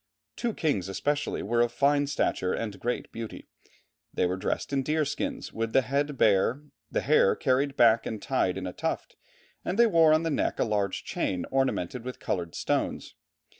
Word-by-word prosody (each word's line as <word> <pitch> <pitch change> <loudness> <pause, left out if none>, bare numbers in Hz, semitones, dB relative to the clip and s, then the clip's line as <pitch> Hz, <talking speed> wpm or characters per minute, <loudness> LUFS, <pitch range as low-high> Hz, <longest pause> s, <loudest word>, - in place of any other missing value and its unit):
Two 235 -3 -2
kings, 100 - 0
especially, 145 +9 -1
were 120 +3 +1
of 120 0 +2
fine 145 +3 +2
stature 95 -9 0
and 105 -4 -4
great 120 +5 -3
beauty. 115 -1 -7 0.7
They - - +1
were 90 +1 0
dressed 95 - -3
in 135 - +2
deer 155 +3 0
skins, 270 - -4
with 115 0 -3
the 135 - +5
head 140 +2 -1
bare, 110 +7 +3 0.3
the - - -1
hair 465 0 +4
carried 135 +1 +1
back 115 -1 +5
and 110 - -4
tied 100 -7 0
in 95 - -4
a 90 - -5
tuft, - - -3 0.5
and 185 - -2
they 235 - +7
wore 165 -7 +5
on 155 +1 +4
the 165 - -1
neck - - 0
a - - +3
large 105 -3 -1
chain 90 -2 -2
ornamented 130 -4 0
with 125 0 -6
coloured 85 -3 -3
stones. - - -2
130 Hz, 185 wpm, -28 LUFS, 105-145 Hz, 0.7 s, they